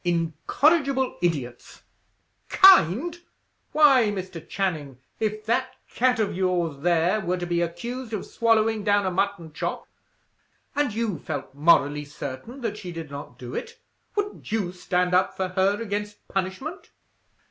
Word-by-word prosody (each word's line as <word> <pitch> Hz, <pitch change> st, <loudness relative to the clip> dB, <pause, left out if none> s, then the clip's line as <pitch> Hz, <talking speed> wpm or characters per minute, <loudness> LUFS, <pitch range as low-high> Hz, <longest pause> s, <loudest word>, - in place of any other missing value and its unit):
Incorrigible 265 Hz, -, +1 dB
idiots! 140 Hz, -9 st, -3 dB, 0.7 s
Kind! 345 Hz, -, +6 dB, 0.5 s
Why, 280 Hz, -6 st, +6 dB
Mr. 185 Hz, -5 st, -6 dB
Channing, 155 Hz, -9 st, -2 dB, 0.2 s
if 215 Hz, 0 st, -2 dB
that 255 Hz, +3 st, 0 dB, 0.2 s
cat 250 Hz, +1 st, +2 dB
of 210 Hz, -4 st, 0 dB
yours 175 Hz, -5 st, 0 dB
there, 175 Hz, +5 st, +2 dB
were 180 Hz, -1 st, -1 dB
to 175 Hz, -, -3 dB
be 175 Hz, 0 st, 0 dB
accused 235 Hz, +9 st, -4 dB
of 215 Hz, -4 st, -3 dB
swallowing 225 Hz, -2 st, +2 dB
down 205 Hz, -1 st, +3 dB
a 185 Hz, -, 0 dB
mutton 190 Hz, -4 st, -2 dB
chop, -, -, -4 dB, 0.9 s
and 290 Hz, -4 st, +1 dB
you 215 Hz, -6 st, -2 dB
felt 145 Hz, -3 st, -5 dB
morally 150 Hz, -1 st, +3 dB
certain 145 Hz, -, -7 dB
that 215 Hz, -3 st, -3 dB
she 180 Hz, -4 st, -7 dB
did 165 Hz, -3 st, -7 dB
not 140 Hz, -3 st, -8 dB
do 125 Hz, -1 st, -8 dB
it, 470 Hz, 0 st, -5 dB, 0.4 s
wouldn't 410 Hz, -, -3 dB
you 205 Hz, -5 st, 0 dB
stand 180 Hz, 0 st, -1 dB
up 185 Hz, +1 st, +2 dB
for 190 Hz, -1 st, -1 dB
her 190 Hz, +2 st, +1 dB
against 210 Hz, -1 st, -5 dB
punishment?" 195 Hz, -, -4 dB
190 Hz, 140 wpm, -25 LUFS, 170-230 Hz, 0.9 s, Kind